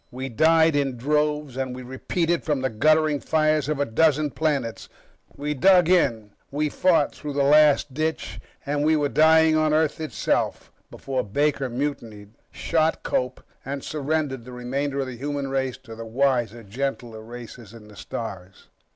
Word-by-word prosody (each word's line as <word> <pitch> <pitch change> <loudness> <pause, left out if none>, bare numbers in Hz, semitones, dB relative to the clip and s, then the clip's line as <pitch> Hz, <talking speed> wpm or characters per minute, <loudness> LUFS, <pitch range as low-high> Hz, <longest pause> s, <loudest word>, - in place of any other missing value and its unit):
We 130 +1 -6
died 160 +4 +4
in 135 -3 0
droves, 150 +1 0
and 130 -1 -3
we 130 - -8
retreated 165 +7 -2
from 150 -4 -1
the 130 - -1
guttering 155 +5 +2
fires 155 -1 +1
of 150 -2 -1
a 145 - +2
dozen 150 +4 +2
planets, 140 -8 -2 0.5
we 150 +1 -2
dug 180 +4 +4
in, 115 - +2 0.2
we 150 +2 -1
fought 180 +3 +2
through 150 -1 -7
the 140 0 +1
last 150 -1 +4
ditch, 155 +3 -3 0.3
and 145 +1 -1
we 155 +1 +3
were 145 -2 +1
dying 160 +2 +5
on 155 -1 +2
Earth 160 0 0
itself 155 - -2 0.2
before 130 -2 -3
Baker 140 +5 0
mutinied, 120 -6 -5 0.2
shot 160 0 0
Cope, 125 0 -2 0.2
and 140 +1 -5
surrendered 150 -3 -2
the 125 +1 -11
remainder 135 +3 -2
of - - -2
the 130 -2 -7
human 140 +1 -3
race 130 -2 -2
to 115 - -10
the 115 - -7
wiser, 120 -2 0
gentler 120 0 -4
races 120 -1 -11
in 110 -2 -14
the 105 - -15
stars. 95 -4 -8
140 Hz, 165 wpm, -24 LUFS, 125-155 Hz, 0.5 s, dying